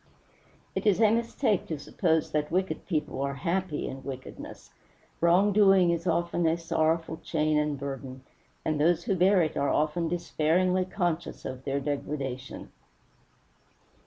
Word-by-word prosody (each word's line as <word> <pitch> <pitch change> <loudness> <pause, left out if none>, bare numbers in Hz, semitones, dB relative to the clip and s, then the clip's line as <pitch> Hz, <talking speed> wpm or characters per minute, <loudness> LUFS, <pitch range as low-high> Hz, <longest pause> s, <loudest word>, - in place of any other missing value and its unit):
It - - -2
is 205 -1 +4
a 220 -2 +5
mistake 230 -2 0
to 160 - -3
suppose 160 +2 0
that 150 -1 -1
wicked 185 +3 -2
people 155 -6 -2
are 140 0 -2
happy 170 +3 -2
in 135 0 -7
wickedness. 130 -1 -9 0.5
Wrong 180 +5 +4
doing 195 -4 +5
is 170 +1 -2
often 170 0 +1
a 160 +1 +2
sorrowful 165 0 0
chain 155 -2 0
and 150 -1 -1
burden, 135 -1 -6 0.4
and 155 -2 0
those 170 +2 +3
who 195 - 0
bear 185 0 +4
it 155 - -2
are 140 - +1
often 155 +3 +1
despairingly 175 +2 +1
conscious 175 -3 -3
of 130 0 -6
their 140 0 0
degradation. 135 -2 -4
165 Hz, 145 wpm, -28 LUFS, 145-180 Hz, 0.5 s, a